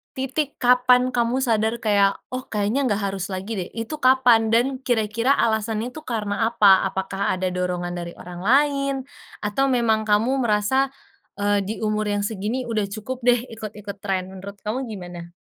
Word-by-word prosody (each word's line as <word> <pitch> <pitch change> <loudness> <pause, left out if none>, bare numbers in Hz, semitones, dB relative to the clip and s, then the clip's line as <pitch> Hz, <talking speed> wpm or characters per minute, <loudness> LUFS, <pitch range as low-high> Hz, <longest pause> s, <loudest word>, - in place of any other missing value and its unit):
titik 270 +2 -2
kapan 250 +1 +4
kamu 245 +2 +1
sadar 220 -1 +1
kayak 200 -2 +3 0.2
"Oh 255 0 -5
kayaknya 220 +6 0
nggak 205 -1 0
harus 195 -1 -4
lagi 190 +3 -5
deh." 180 - -4
Itu 230 +7 -5
kapan 250 -4 +5
dan 250 +4 +2
kira-kira 230 +1 +1
alasan 220 -1 0
itu 250 +6 -6
karena 220 -1 -1
apa? 200 -5 +5
Apakah 190 0 -2
ada 185 0 -2
dorongan 180 -1 -2
dari 170 0 -7
orang 175 0 -9
lain? 275 +1 +3 0.5
Atau 240 +7 +1
memang 225 -4 +1
kamu 230 +6 +2
merasa, 240 +4 +2 0.5
eee, 205 0 +1
di 215 - -2
umur 215 0 0
yang 205 0 0
segini 220 +5 -2
udah 220 -4 -1
cukup 220 +6 -6
deh 245 -1 +4
ikut-ikut 210 -2 -8
tren, 190 -2 -2
menurut 195 +2 -9
kamu 245 +4 -3
gimana? 175 -5 -8
220 Hz, 165 wpm, -23 LUFS, 200-250 Hz, 0.5 s, kapan